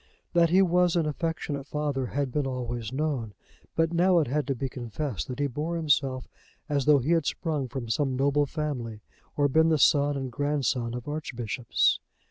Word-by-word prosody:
That 170 -1 +4
he 185 +3 +5
was 180 -1 +3
an 170 -2 +2
affectionate 150 -2 -3
father 145 -4 -2
had 140 0 -2
been 145 +1 0
always 120 -4 -4
known; 130 -7 -2 0.4
but 165 +1 +1
now 180 +1 +4
it 160 - +4
had 145 +2 -1
to 135 - 0
be 135 +2 -2
confessed 125 - -4
that 125 - -5
he 145 - 0
bore 150 +5 -3
himself 140 -5 +1 0.4
as 145 -4 0
though 150 -1 +6
he 140 +5 0
had 165 -4 +2
sprung 150 -6 -2
from 125 -1 -5
some 130 +3 0
noble 140 +2 +2
family 130 -8 -4 0.4
or 145 -1 +4
been 160 +4 +4
the 160 - +3
son 145 0 +4
and 135 -2 -4
grandson 130 -3 -1
of 125 +1 -7
archbishops. 125 -6 0
145 Hz, 185 wpm, -27 LUFS, 125-155 Hz, 0.4 s, though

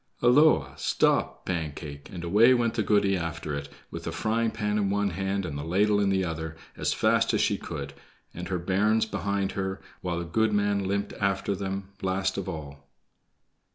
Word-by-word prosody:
"Holloa! 145 +6 +5
Stop, - - +1
Pancake!" 75 -4 -4
and 85 -2 -6
away 110 +9 +6
went 120 -2 +1
the 120 - 0
goody 100 -1 +3
after 80 -3 -3
it, 70 0 -4 0.2
with - - -7
the - - -2
frying 115 +1 0
pan 105 -1 -1
in 100 -2 +1
one 100 0 +1
hand 95 +2 -2
and 80 -5 -5
the 70 - -4
ladle 100 +5 +2
in 100 -1 +2
the 95 -1 +1
other, 80 -1 -4 0.2
as - - -1
fast - - +2
as - - +2
she - - +2
could, 70 0 -6 0.4
and 90 +1 -6
her 95 - -1
bairns 100 +6 +2
behind 100 -1 -1
her, 95 0 -3 0.2
while 90 -2 -2
the 85 - -3
goodman 100 +1 +1
limped 100 +1 -1
after 100 0 +1
them 95 0 -4
last 95 0 0
of - - -3
all. 70 -3 -8
95 Hz, 185 wpm, -27 LUFS, 85-105 Hz, 0.4 s, away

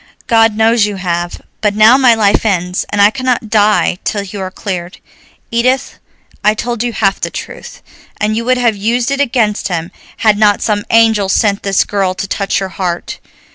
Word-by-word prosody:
"God 225 -2 +3
knows 225 -1 +3
you 205 - -5
have, 175 -2 -4 0.2
but 210 -1 0
now 215 +3 +6
my 255 -3 +4
life 205 -2 +2
ends, 180 -4 -1
and 205 - -2
I 200 +1 +6
cannot 250 -3 -2
die 210 -4 +2
till 205 -2 -2
you 200 0 -7
are 185 - -4
cleared. 180 -2 -6 0.5
Edith, 255 +3 0 0.4
I 210 +1 +3
told 235 0 -3
you 240 0 -1
half 200 -3 0
the - - -2
truth, - - -9 0.4
and 210 +1 0
you 230 - -2
would 255 +1 +2
have 235 -3 +1
used 235 +5 -1
it 275 0 0
against 230 -6 0
him 170 -3 -4 0.3
had 215 -2 +2
not 210 -1 +3
some 205 -2 -1
angel 225 -3 +3
sent 200 0 +1
this 195 -1 +1
girl 195 -2 -1
to 195 - -4
touch 195 0 -1
your 195 -1 -4
heart. 180 -2 -4
210 Hz, 190 wpm, -14 LUFS, 195-230 Hz, 0.5 s, now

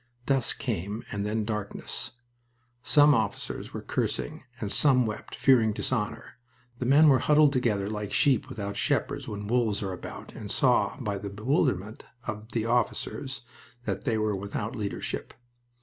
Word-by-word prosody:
Dusk 135 -3 +2
came, 100 +6 -3
and 100 0 -2
then 110 0 -1
darkness. 105 +3 -4 0.7
Some 145 +3 +6
officers 110 -4 -2
were - - -6
cursing, 60 -2 -2 0.2
and 105 -2 -3
some 125 +3 +4
wept, 110 -1 -5
fearing 115 -5 +4
dishonor. 115 +1 -3 0.4
The 125 - -1
men 145 +4 +7
were 135 -3 +6
huddled 150 +1 +5
together 110 -7 +1
like 105 -1 -4
sheep 135 -6 +3
without 100 -2 -4
shepherds - - 0
when 105 -1 -5
wolves 110 -2 +1
are 95 -1 -2
about, 90 - -8
and - - -7
saw - - +2
by 100 -1 -2
the 100 - -5
bewilderment 105 - 0 0.2
of 110 0 -5
the 115 -2 0
officers 120 +2 -1 0.4
that 100 -2 -2
they 115 - +1
were 110 -1 +1
without 100 +3 -4
leadership. 105 -4 -4
110 Hz, 150 wpm, -28 LUFS, 105-125 Hz, 0.7 s, men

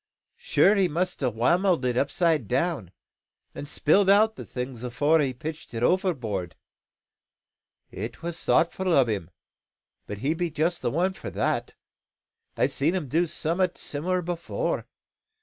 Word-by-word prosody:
Sure 200 - +4
he 195 -3 +3
must 175 +2 -2
a' 130 - +2
whammelled 170 - +2
it 125 -1 +1
upside 145 - +1
down, 125 - -1 0.6
and 145 - -7
spilled 190 +7 +3
out 215 +2 +5
the - - -7
things 125 -1 -5
afore 140 +6 +2
he 140 -3 +1
pitched 150 +1 -7
it 115 - -2
overboard. 125 - 0 1.4
It 110 +8 -7
was 170 0 -5
thoughtful 185 +2 +2
o' 135 -4 +5
him; 100 -7 -3 0.8
but 105 - -5
he 135 +9 0
be 175 +1 -2
just 160 +3 -1
the - - 0
one 180 +8 0
for - - -7
that. - - -1 0.8
I've - - +2
seed 155 +6 +1
him 160 -8 -3
do 170 +5 +2
some'at 170 +3 -1
similar 180 +5 -2
afore. 175 - -2
160 Hz, 150 wpm, -26 LUFS, 125-180 Hz, 1.4 s, out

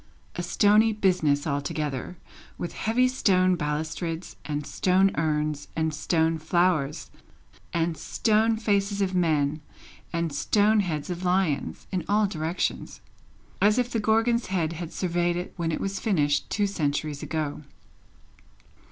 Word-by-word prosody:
A - - -2
stony 210 +5 +4
business 180 -8 +1
altogether, 145 +2 -3 0.4
with 175 - -5
heavy 245 +4 +2
stone 185 -8 +3
balustrades, 160 +2 -3
and 150 -1 -3
stone 190 +4 +2
urns, 150 -1 -1
and 160 -1 0
stone 160 +1 +1
flowers, 160 -3 0 0.6
and 165 0 0
stone 220 +7 +1
faces 200 -2 +1
of 190 -1 -1
men, 155 -4 +1 0.5
and 170 -3 -2
stone 210 +8 +3
heads 170 -4 -2
of 175 +1 -5
lions, 180 -6 0
in 185 -3 -1
all 210 +1 +3
directions. 165 -2 -3 0.6
As 210 +3 +4
if 245 -1 0
the 230 - 0
Gorgon's 225 +2 +2
head 170 -4 -1
had 170 0 -6
surveyed 175 -1 0
it, 180 +1 -5
when 170 -2 -2
it - - -2
was 195 0 -3
finished, 145 -9 +1
two 205 - +1
centuries 150 -5 -2
ago. 155 -2 -3
175 Hz, 135 wpm, -26 LUFS, 155-200 Hz, 0.6 s, stony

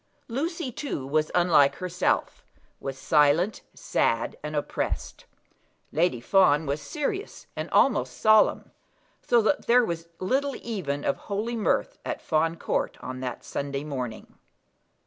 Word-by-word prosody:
Lucy, 290 +3 -3
too, 235 - -4
was 155 +2 +1
unlike 155 -6 +5
herself, 180 +1 -1 0.4
was 135 -1 -5
silent, 155 +8 +3
sad, 115 0 0
and 150 0 -5
oppressed. 145 - -3 0.7
Lady 160 -6 +1
Fawn 160 +1 +4
was 140 +1 -2
serious, 340 - -4
and - - -4
almost - - +2
solemn; 215 -1 +4 0.5
so 235 -2 +3
that 285 - +1
there 245 0 +5
was 170 -2 -4
little 270 +9 0
even 165 -11 -3
of - - +1
holy 215 +4 -3
mirth 230 - 0
at - - -3
Fawn 165 +1 +1
Court - - -2
on 130 0 -6
that 125 -2 -5
Sunday 140 0 -4
morning. 125 -6 -6
170 Hz, 130 wpm, -26 LUFS, 145-230 Hz, 0.7 s, unlike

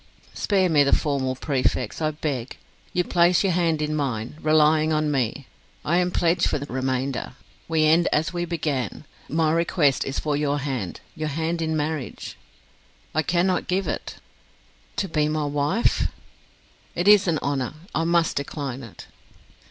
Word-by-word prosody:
"Spare 195 -3 +2
me 150 -4 +4
the 140 - +4
formal 135 -3 -1
prefix, 130 -2 -1
I 155 - +2
beg. 145 -5 -4 0.3
You 180 - +1
place 175 +1 +3
your 190 -3 +2
hand 165 -3 +1
in 150 0 -1
mine, 125 -4 -2
relying 155 0 +4
on 155 -1 +1
me. 135 0 -1 0.4
I 170 +3 +2
am 180 0 +2
pledge 175 0 +2
for - - 0
the 140 - -5
remainder. 130 -1 -2 0.3
We 160 -1 +2
end 165 +3 +4
as 160 +3 +1
we 175 0 -1
began: 150 - -2 0.3
my 160 +1 +2
request 165 -4 +2
is 135 - -4
for 150 -2 -1
your 145 0 0
hand 130 -10 -4
your 155 -1 -3
hand 165 +3 -2
in 160 -1 0
marriage." 150 -3 -4 0.8
"I 155 - +2
cannot 180 +3 +1
give 190 +1 0
it." - - -4 0.8
"To 195 - -1
be 155 -3 +1
my 155 0 -1
wife!" 145 +10 +1 0.9
"It 175 +3 -1
is 205 -2 +7
an 165 -2 +2
honour; 140 -1 -1 0.2
I 165 - +1
must 170 -1 +2
decline 140 -2 -4
it." 115 -5 -11
155 Hz, 160 wpm, -24 LUFS, 140-170 Hz, 0.9 s, is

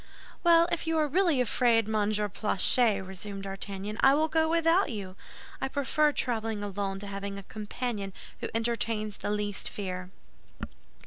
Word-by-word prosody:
"Well, 335 -1 +6
if 340 -1 -2
you 325 0 +1
are 305 -1 +2
really 335 -2 +2
afraid, 230 -2 +2
Monsieur 210 -1 +1
Planchet," 205 +1 +3
resumed 195 +1 -7
D'Artagnan, 195 +2 -5
"I 270 +1 +6
will 315 +2 +1
go 320 0 +2
without 335 +3 +3
you. 195 -6 -6 0.5
I 265 - 0
prefer 285 +2 +2
traveling 225 -6 -1
alone 200 -1 -3
to - - -4
having 200 0 -5
a 200 - -8
companion 210 0 -4 0.3
who - - -4
entertains 225 -2 -1
the - - -4
least 205 -1 -1
fear." 185 -2 -5
215 Hz, 150 wpm, -29 LUFS, 200-270 Hz, 0.5 s, Well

